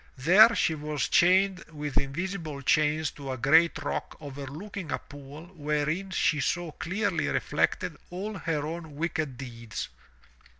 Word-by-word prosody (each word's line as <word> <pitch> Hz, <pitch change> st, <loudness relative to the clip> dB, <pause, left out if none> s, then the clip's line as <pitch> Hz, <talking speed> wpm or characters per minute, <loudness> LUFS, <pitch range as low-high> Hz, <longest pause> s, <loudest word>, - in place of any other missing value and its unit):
There 200 Hz, -, +7 dB
she 160 Hz, -, +2 dB
was 150 Hz, -2 st, -2 dB
chained 190 Hz, +1 st, +4 dB
with 150 Hz, -2 st, -5 dB
invisible 155 Hz, 0 st, -4 dB
chains 155 Hz, +1 st, +2 dB
to 140 Hz, -2 st, -7 dB
a -, -, -5 dB
great 160 Hz, +8 st, +4 dB
rock -, -, -3 dB
overlooking 150 Hz, +6 st, -7 dB
a -, -, +1 dB
pool 145 Hz, +2 st, -11 dB
wherein 150 Hz, +4 st, -1 dB
she 165 Hz, -4 st, +1 dB
saw 175 Hz, +4 st, -1 dB
clearly 185 Hz, 0 st, -1 dB
reflected -, -, 0 dB
all 195 Hz, +5 st, -4 dB
her 155 Hz, -3 st, -1 dB
own 160 Hz, -1 st, -6 dB
wicked 155 Hz, -4 st, -2 dB
deeds. 115 Hz, -3 st, -6 dB
155 Hz, 135 wpm, -28 LUFS, 145-175 Hz, -, There